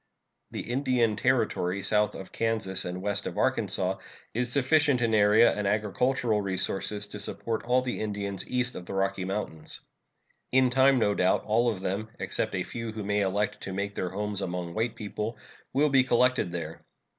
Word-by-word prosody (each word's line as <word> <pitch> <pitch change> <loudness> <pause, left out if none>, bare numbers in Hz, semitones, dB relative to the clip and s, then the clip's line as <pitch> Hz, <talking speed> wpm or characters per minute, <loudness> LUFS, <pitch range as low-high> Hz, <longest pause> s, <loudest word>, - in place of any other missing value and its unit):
The - - -4
Indian 120 -3 +1
Territory 105 -6 +1
south 105 +1 +2
of 95 - -8
Kansas 110 -4 -1
and 90 +1 -4
west 100 0 -1
of - - -6
Arkansas - - 0 0.3
is 120 +1 0
sufficient 140 0 +3
in 115 -2 +1
area 105 +2 +6
and 105 -1 -2
agricultural 110 +2 +1
resources 100 +1 -1
to 105 0 -9
support 110 +2 -3
all 125 +1 +3
the 125 - -3
Indians 100 -3 -3
east 125 0 0
of 90 - -8
the - - -5
Rocky 95 -1 0
Mountains. 95 -5 -4 0.7
In 130 -1 +4
time, 135 +1 +5
no 105 -4 +3
doubt, 95 -1 +2
all 115 +3 +2
of 100 -5 -3
them, 100 +4 -2
except - - -2
a - - 0
few 115 -1 -5
who 110 -1 -5
may 105 +1 +1
elect 100 +2 0
to 95 - -5
make 100 +1 -2
their 90 - -2
homes 105 +1 -3
among 90 -2 -3
white 110 +4 -1
people, 105 +1 -4 0.3
will 145 +3 +3
be 135 -2 +5
collected 125 -5 +2
there. 85 -2 -6
105 Hz, 180 wpm, -28 LUFS, 100-120 Hz, 0.7 s, area